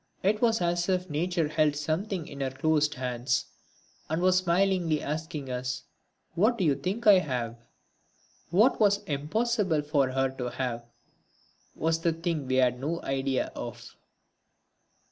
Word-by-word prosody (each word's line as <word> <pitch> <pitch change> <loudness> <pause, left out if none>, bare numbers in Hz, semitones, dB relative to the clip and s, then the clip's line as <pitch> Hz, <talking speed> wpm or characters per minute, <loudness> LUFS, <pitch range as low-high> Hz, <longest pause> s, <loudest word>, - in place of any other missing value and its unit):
It 210 +3 +2
was 225 -4 +3
as 175 +1 0
if 185 -2 0
nature 170 +1 0
held 155 -1 +2
something 160 +4 -2
in 140 - -8
her 135 - 0
closed 150 +2 +1
hands 125 -1 -1 0.6
and 160 +1 0
was 185 +1 +4
smilingly 180 -3 +2
asking 150 -3 -4
us: 125 0 -3 0.5
"What 220 +7 +2
d'you 170 -8 +3
think 185 - -3
I 205 -3 +8
have?" 125 -8 -3 0.9
What 210 +9 +4
was 205 -2 +3
impossible 175 - 0
for 145 -3 +1
her 135 +1 +1
to 125 -1 -2
have 120 -2 -4 0.9
was 165 0 0
the 165 0 +1
thing 165 -4 -3
we 130 - 0
had 125 -1 +3
no 160 +5 -2
idea 135 -1 -1
of. - - -8
155 Hz, 145 wpm, -28 LUFS, 135-185 Hz, 0.9 s, I